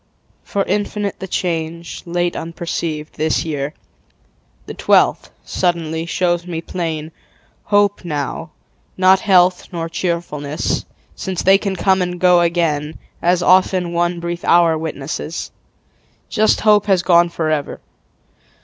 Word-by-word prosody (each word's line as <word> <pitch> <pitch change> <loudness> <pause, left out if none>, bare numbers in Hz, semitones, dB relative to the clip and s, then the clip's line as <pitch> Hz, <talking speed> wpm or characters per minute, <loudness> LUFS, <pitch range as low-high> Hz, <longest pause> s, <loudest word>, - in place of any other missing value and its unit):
For 200 - -1
infinite 205 0 -2
The 190 - -5
change, 170 -2 -3
late 175 0 -1
unperceived, 165 -2 -4
this 155 +1 0
year, 150 -1 -3 0.9
The - - -7
twelfth, - - +2 0.2
suddenly, 165 -2 -1
shows 175 0 0
me 165 -2 -3
plain. 160 -2 -4 0.5
Hope 205 -1 +2
now, 155 0 -4 0.5
not 185 +1 +5
health 185 -2 +3
nor 165 -2 -3
cheerfulness, 165 -4 -2 0.3
Since 190 -2 -4
they 195 +1 +6
can 200 -2 -2
come 190 +1 +2
and 180 0 -2
go 180 -1 +5
again, 160 -3 0 0.2
As 175 +1 +2
often 185 -1 +3
one 175 0 0
brief 170 0 -4
hour 170 -2 +4
witnesses, 155 0 -5 0.8
Just 215 0 +2
hope 210 -1 +4
has 190 -3 +3
gone 175 -1 +4
forever. 155 -3 -2
175 Hz, 120 wpm, -18 LUFS, 160-185 Hz, 0.9 s, they